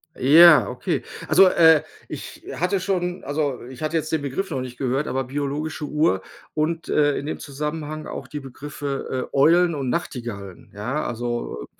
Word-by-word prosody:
Ja, 160 +4 +7
okay. - - -2 0.3
Also, 185 +4 +7
äh, 160 -4 +6 0.3
ich - - -8
hatte 185 +3 0
schon 180 -2 -2
also, 145 -3 -2
ich 130 +3 -11
hatte 155 +2 -2
jetzt 155 -1 -1
den 160 - 0
Begriff 145 +8 -3
noch 135 - -1
nicht 125 -1 -7
gehört. 135 +3 -1
Aber 135 +1 -1
biologische 145 +3 -3
Uhr 150 - +1 0.3
und, 160 +1 -1
äh, 145 -1 +2
in 140 - -4
dem 155 - -4
Zusammenhang 150 +2 -5
auch - - -7
die 150 -2 -6
Begriffe, 135 -1 -5
äh, - - -4
Eulen 170 +4 +5
und 135 -3 -2
Nachtigallen, 120 - -5
ja, 125 +9 -3
also. 120 - -4
145 Hz, 170 wpm, -23 LUFS, 130-160 Hz, 0.3 s, Ja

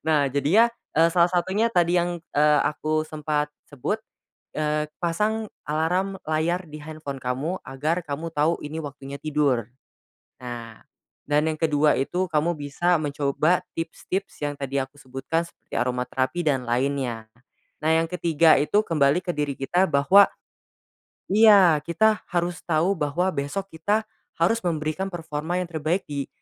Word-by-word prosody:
Nah 150 -3 +3
jadinya, 155 - +4 0.2
eee, 165 +2 +4
salah 170 +1 +3
satunya 190 +6 +1
tadi 175 -1 +3
yang, 175 -1 0 0.2
eee, 150 0 +5
aku 155 +1 -1
sempat 150 -1 -1 0.2
sebut, 145 - -3 0.6
eee, 150 0 0 0.2
pasang 210 +6 -1 0.2
alarm 180 +6 0
layar 160 +4 0
di 150 -2 -10
handphone 150 -3 -7
kamu 135 +9 -2
agar 150 +6 -2
kamu 160 +4 -4
tahu 155 +2 +2
ini 155 +2 -5
waktunya 140 -1 -8
tidur. 145 -7 0 0.7
Nah 120 -2 -8 0.5
dan 150 +1 +2
yang 155 - -4
kedua 150 -2 +3
itu 180 +6 -1
kamu 160 +2 +1
bisa 150 +4 0
mencoba 145 +4 +1 0.2
tips-tips 175 +4 -4
yang 145 - -3
tadi 140 -1 -3
aku 135 +1 -3
sebutkan 135 +4 -3
seperti 170 - -13
aroma 125 0 0
terapi 135 +7 -2
dan 135 -4 +2
lainnya. 125 -2 -1 0.6
Nah, 155 - +2
yang 165 0 +3
ketiga 165 -2 +3
itu 150 +9 +2
kembali 145 -1 +3
ke 180 -1 -3
diri 145 -2 -2
kita 175 +7 +1
bahwa 170 +8 +6 1.0
iya 200 -7 +7
kita 210 +8 +2
harus 175 0 -1
tahu 165 +3 +2
bahwa 180 +1 0
besok 150 +7 -4
kita 205 +7 0 0.3
harus 200 +8 +2
memberikan 155 +3 -2
performa 165 -2 -4
yang 170 - -11
terbaik 160 +4 -1
di 140 -2 -4
155 Hz, 145 wpm, -24 LUFS, 145-175 Hz, 1.0 s, iya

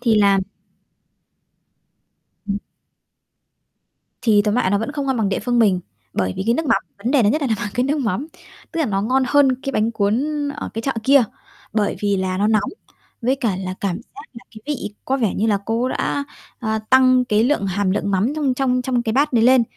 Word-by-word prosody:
Thì 235 -3 +2
làm 200 -2 +4 2.1
Ừm. 200 0 -1 1.6
Thì 210 -3 +4
tóm 210 0 0
lại 235 -6 +1
nó 200 - +2
vẫn 225 +7 -3
không 285 -2 -3
ngon 265 - 0
bằng 220 -4 +1
địa 195 - -1
phương 245 -1 0
mình, 200 -6 +3 0.3
bởi 95 -1 0
vì, - - -2
cái 235 - +3
nước 325 +4 -2
mắm, - - +2 0.2
vấn 230 +5 -2
đề 280 -4 +4
lớn 210 0 +3
nhất 305 - 0
là - - +1
nằm 220 - +1
ở - - -2
cái 245 - +1
nước 290 +3 0
mắm. 235 +3 -1 0.5
Tức 335 - -2
là 310 - +2
nó 195 -2 -1
ngon 255 +5 +2
hơn 265 -1 +3
cái 275 - -3
bánh 220 0 +1
cuốn 215 +4 +1 0.3
ở - - -5
cái 225 - -3
chợ 270 - 0
kia, 275 0 +6 0.5
bởi 210 -2 0
vì 205 -1 +1
là 185 -1 -1
nó 205 - +2
nóng, 215 -1 +1 0.5
với 255 +3 +2
cả 225 -8 -1
là 185 -1 -4
cảm 190 -3 -1 0.2
giác 415 - -9
là, 235 - -12
cái, 215 - -12
vị 270 -8 -4
có 265 - 0
vẻ 225 -7 0
như 215 - 0
là 205 -3 +2
cô 230 +2 0
ấy 255 - 0
đã, 285 - -1 0.4
ờ, 220 -2 -1
tăng 255 -1 +5
cái 215 -2 +2
lượng 250 -6 +1
hàm 195 0 0
lượng 200 +1 -1
mắm 205 +9 +1
trong 280 -4 0
trong 255 -1 +1
trong 250 -1 0
cái 225 -2 -1
bát 285 +3 +2
đấy 230 -2 +3
lên, 255 0 +6
230 Hz, 230 wpm, -20 LUFS, 205-260 Hz, 2.1 s, kia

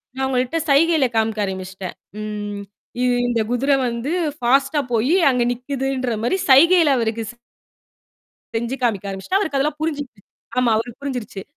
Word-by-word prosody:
நான் 265 - -2
அவுங்கள்ட்ட 255 +3 0
சைகையில 310 +1 +4
காமிக்க 220 -1 +1
ஆரம்பிச்சிட்டேன். 190 -1 -6 0.2
ம் 205 -1 -5 0.4
இ - - +2 0.2
இந்தக் 230 -2 0
குதிரை 275 +3 +2
வந்து 235 +4 -3 0.3
ஃபாஸ்ட்டா 275 +3 +2
போயி 240 +9 +2
அங்க 250 -2 +2
நிக்குதுன்ற 260 0 -2
மாரி 245 +11 +1
சைகையில 325 +1 +6
அவருக்கு 225 -1 -1
ஸ் - - -20 1.2
செஞ்சு 235 +3 -2
காமிக்க 205 -5 0
ஆரம்பிச்சுட்டேன். 195 - -1
அவருக்கு 315 -9 -1
அதெல்லாம் 295 +2 0
புரிஞ்சிருச்சு. 290 -8 -4 0.4
ஆமா, 250 -2 +3
அவருக்குப் 240 +4 -5
புரிஞ்சிருச்சு. 245 -8 -5
250 Hz, 140 wpm, -21 LUFS, 220-280 Hz, 1.2 s, சைகையில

